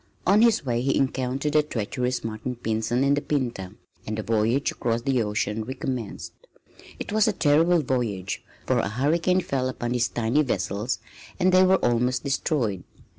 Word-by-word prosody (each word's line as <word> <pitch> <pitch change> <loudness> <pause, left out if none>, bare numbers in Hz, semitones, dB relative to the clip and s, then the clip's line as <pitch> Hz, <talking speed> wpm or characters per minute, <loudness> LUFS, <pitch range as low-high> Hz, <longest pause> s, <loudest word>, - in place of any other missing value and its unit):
On 200 +3 +5
his 230 -9 +4
way 120 -2 0
he 135 +2 +1
encountered 135 +2 -1
the 155 - +5
treacherous 125 -2 -2
Martin 115 +3 -4
Pinzon 115 +2 -1
in 140 +1 +3
the 145 - +1
Pinta, 120 -11 -3 0.3
and 110 0 -3
the 110 - -3
voyage 115 +5 +1
across 115 0 -2
the 130 -2 +1
ocean 105 0 -1
recommenced. 125 -2 -5 0.6
It - - -6
was 215 0 +3
a 215 - +2
terrible 165 +1 +3
voyage, 110 -8 -2 0.2
for - - +2
a - - -1
hurricane 160 - +1
fell 130 -5 -1
upon 120 -2 -4
the 125 - 0
tiny 120 +4 +1
vessels 105 -2 -1 0.4
and 185 0 +3
they 185 0 +6
were 190 +1 +5
almost 125 +1 +1
destroyed. 135 - -1
125 Hz, 170 wpm, -25 LUFS, 110-145 Hz, 0.6 s, they